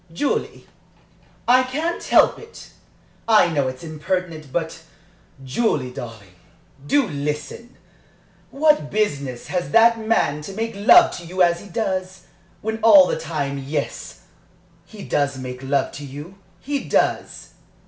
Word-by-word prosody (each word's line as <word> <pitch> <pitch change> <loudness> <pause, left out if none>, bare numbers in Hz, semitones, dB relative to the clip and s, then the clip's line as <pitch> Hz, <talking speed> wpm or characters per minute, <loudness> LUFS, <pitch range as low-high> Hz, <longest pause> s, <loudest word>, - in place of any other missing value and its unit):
"Julie, 280 +13 -2 0.8
I 250 +2 +6
can't 300 +7 -3
help - - +4
it! 455 0 -13 0.6
I 215 -6 +5
know 145 -5 0
it's 130 +2 -6
impertinent 160 -1 -4
but 165 0 -3 0.6
Julie, 130 - -1
darling! 115 -6 -10 0.5
do 265 - +2
listen! 150 - -5 0.7
What 300 - +2
business 140 - -2
has 180 -1 -2
that 230 0 +5
man 220 -10 0
to 175 +6 -8
make 225 +3 -3
love 340 - +6
to 175 - -10
you 185 +1 +1
as 170 0 +2
he 205 - -13
does, 190 -2 -3 0.4
when 220 +1 -3
all 205 -4 +8
the - - -2
time 145 -4 -3
Yes, 140 +2 -5 0.6
he 205 +3 -11
does 140 -2 -1
make 125 -1 -7
love 135 0 0
to 145 - -9
you 145 +6 -9 0.3
he 285 0 -3
does! - - -1
175 Hz, 135 wpm, -21 LUFS, 140-220 Hz, 0.8 s, all